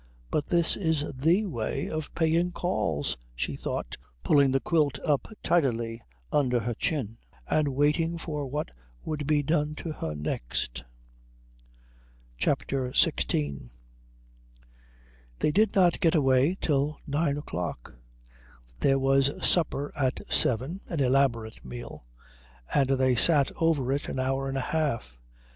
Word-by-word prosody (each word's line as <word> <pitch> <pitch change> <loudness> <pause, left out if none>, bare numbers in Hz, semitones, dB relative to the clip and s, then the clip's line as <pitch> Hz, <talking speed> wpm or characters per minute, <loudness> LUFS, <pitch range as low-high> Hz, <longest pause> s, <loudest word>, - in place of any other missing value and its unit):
"But 145 - 0
this 170 -1 +3
is 160 -7 0
the 165 +11 +2
way 120 - -3
of 155 -1 -4
paying 170 +2 +2
calls," 80 - -1 0.2
she - - -2
thought, - - -4 0.3
pulling 140 -2 +4
the 135 - +2
quilt 150 -2 +1
up 145 -4 +1 0.2
tidily 120 -8 +1 0.3
under 125 -5 +2
her 120 +2 -2
chin 115 -3 -2 0.3
and 155 -1 +2
waiting 150 +5 +1
for 150 -4 -4
what 150 +3 -3 0.3
would 150 -2 -3
be 150 -1 +2
done 150 0 0
to 160 - -5
her 80 - -4
next. 60 -4 -3 1.5
CHAPTER 130 -2 0
XVI 70 - +1 1.7
They 150 - +1
did 210 +4 +2
not 180 -3 +4
get 165 -1 +3
away 135 +4 +3
till 145 0 0
nine 145 0 0
o'clock. 90 - -5 0.9
There 135 0 +3
was 135 +1 +2
supper 145 -4 0
at 130 -3 0
seven, 130 - 0
an 165 - -3
elaborate 125 -4 +1
meal, - - -9 0.7
and 135 -2 +3
they 130 -1 +3
sat 140 +3 +4
over 150 -6 +2
it 145 - -3
an - - -4
hour 135 +1 -1
and 135 - -2
a - - 0
half. 125 - -2
140 Hz, 130 wpm, -27 LUFS, 125-155 Hz, 1.7 s, pulling